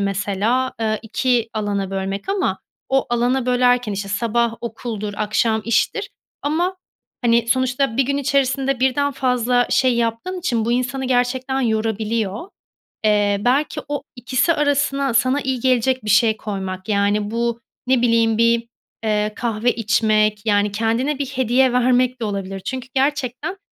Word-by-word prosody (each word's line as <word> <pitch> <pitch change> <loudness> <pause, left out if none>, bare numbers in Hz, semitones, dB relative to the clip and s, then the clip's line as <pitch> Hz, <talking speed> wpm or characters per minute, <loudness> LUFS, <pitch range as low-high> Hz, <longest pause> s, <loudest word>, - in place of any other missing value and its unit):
mesela, 200 +6 0
eee, 215 -1 0
2 235 0 0
alana 200 -2 -2
bölmek 195 - -4
ama 390 -1 0 0.3
o 270 0 +1
alana 245 +2 +1
bölerken, 245 -3 +2
işte, 200 0 -4
sabah 230 +3 0
okuldur 220 -3 -5
akşam 220 +1 +1
iştir 230 0 0 0.3
ama, 345 +6 0 0.5
hani, 235 0 +3
sonuçta 260 -1 +1
1 270 - +4
gün 280 +2 -1
içerisinde 270 -1 0
birden 280 +2 +1
fazla 250 -2 +1
şey 255 -2 +3
yaptığın 235 +11 -2
için 240 -11 -1
bu 235 - 0
insanı 255 +2 -1
gerçekten 255 +1 0
yorabiliyor. 220 - -1 0.6
Eee, 205 -1 +3
belki 260 +7 +1
o 290 -1 -3
ikisi 255 +6 +1
arasına 285 -3 +1
sana 255 +5 +2
iyi 260 -2 -2
gelecek 255 -1 +1
bir - - -3
şey 220 +1 +4
koymak, 190 -2 -5
yani, 205 +1 +1
bu 235 0 -1 0.3
ne 255 -2 +3
bileyim 230 -2 +3
bir, 230 0 +2 0.4
eee, 210 -1 0
kahve 230 0 0
içmek, 215 -1 +1
yani, 205 -1 +2
kendine 230 +7 0
bir 280 - 0
hediye 260 -1 +2
vermek 250 0 +2
de - - 0
olabilir 195 -2 -4
çünkü 255 +6 -5
gerçekten 275 +5 -1
235 Hz, 145 wpm, -20 LUFS, 215-260 Hz, 0.6 s, 1